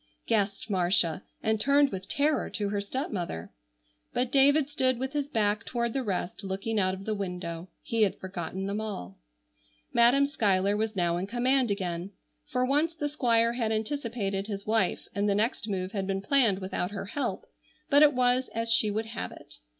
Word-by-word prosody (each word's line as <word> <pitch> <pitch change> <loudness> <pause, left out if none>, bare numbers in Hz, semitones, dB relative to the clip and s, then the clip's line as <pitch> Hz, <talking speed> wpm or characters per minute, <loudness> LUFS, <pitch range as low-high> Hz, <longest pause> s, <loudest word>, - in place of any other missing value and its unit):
gasped 200 -2 0
Marcia, 180 -4 +2 0.2
and 220 -1 +1
turned 280 +2 +4
with 190 0 -6
terror 295 +6 +1
to 205 -1 -2
her 205 0 -1
stepmother. 200 - -4 0.6
But 245 0 0
David 280 +1 +5
stood 260 -4 +2
with 265 +2 -4
his 290 -1 -1
back 215 -3 +1
toward 235 -1 -2
the 270 - 0
rest 200 -2 -3
looking 195 +3 -2
out 185 -1 +1
of 195 +1 -10
the 220 - -1
window. 180 -3 -5
He 230 -1 -1
had 205 -3 +3
forgotten 190 0 -5
them 200 +2 -2
all. 95 - -6 0.7
Madam 245 +4 +5
Schuyler 200 -7 +2
was 220 0 -1
now 175 -2 +1
in 185 +2 -3
command 250 +3 +2
again. 185 -1 -3 0.3
For 250 0 0
once 300 +5 +1
the 295 -2 -2
Squire 235 -5 +2
had 230 -3 -1
anticipated 220 -4 -2
his 200 -2 -5
wife, 215 -4 +1
and 205 +1 0
the 200 - +2
next 220 +1 0
move 185 -1 -2
had 195 -2 -3
been 195 0 -2
planned 235 -5 +3
without 185 -1 -3
her 200 -1 -5
help, 275 +8 -3 0.5
but 285 +1 +6
it 295 -3 +6
was 250 +1 +2
as 230 0 0
she 215 -1 +3
would 215 +2 -2
have 230 +1 -5
it. - - -13
215 Hz, 185 wpm, -28 LUFS, 195-250 Hz, 0.7 s, but